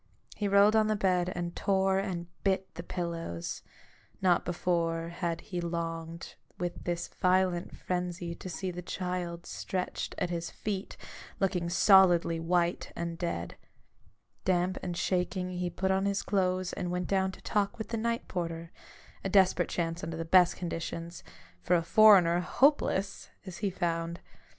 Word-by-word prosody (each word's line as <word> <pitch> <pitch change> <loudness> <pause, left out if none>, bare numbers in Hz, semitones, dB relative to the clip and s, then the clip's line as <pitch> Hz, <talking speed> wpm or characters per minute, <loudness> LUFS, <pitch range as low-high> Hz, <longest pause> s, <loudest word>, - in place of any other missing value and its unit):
He 205 - -1
rolled 200 +2 +5
on 215 -1 +4
the 215 - +2
bed, 185 -3 +1
and 175 -1 -4
tore 190 -1 +2
and 185 -3 -3 0.2
bit 190 -1 0
the - - -6
pillows: 170 - -4 0.6
not 180 -2 +3
before 170 -1 0
had 170 -1 -3
he 180 -4 -4
longed 165 -1 -4 0.2
with 175 0 -4
this 175 -1 -2
violent 185 -1 +1
frenzy 180 -1 -3
to 185 - -8
see 185 +2 -3
the 180 0 -6
child 180 -1 -4
stretched 185 -1 -4
at 175 - -1
his 170 -1 -3
feet, 200 -2 -5 0.4
looking 180 -3 0
solidly 175 -3 +5
white 170 +1 0
and 170 0 -4
dead. 130 - -3 0.9
Damp 185 0 +1
and 175 -1 -4
shaking, 180 0 -1
he 180 0 -2
put 190 +2 -1
on 190 +1 +1
his 200 0 0
clothes 185 -2 0
and 180 - -3
went 180 0 -1
down 190 -1 +1
to - - -13
talk 205 +2 0
with 220 - -6
the 230 - -2
night 230 +1 -1
porter 165 -1 -4 0.3
— - - -24
a 195 - -1
desperate 185 -3 +4
chance 165 0 -2
under 160 0 -4
the 165 - -3
best 180 +1 +5
conditions; 170 0 -5 0.4
for 180 - +2
a 170 - +2
foreigner, 180 -3 +6
hopeless! 205 0 +1 0.2
as 185 -1 -7
he 205 - -1
found. 170 -2 -2
180 Hz, 160 wpm, -30 LUFS, 170-190 Hz, 0.9 s, foreigner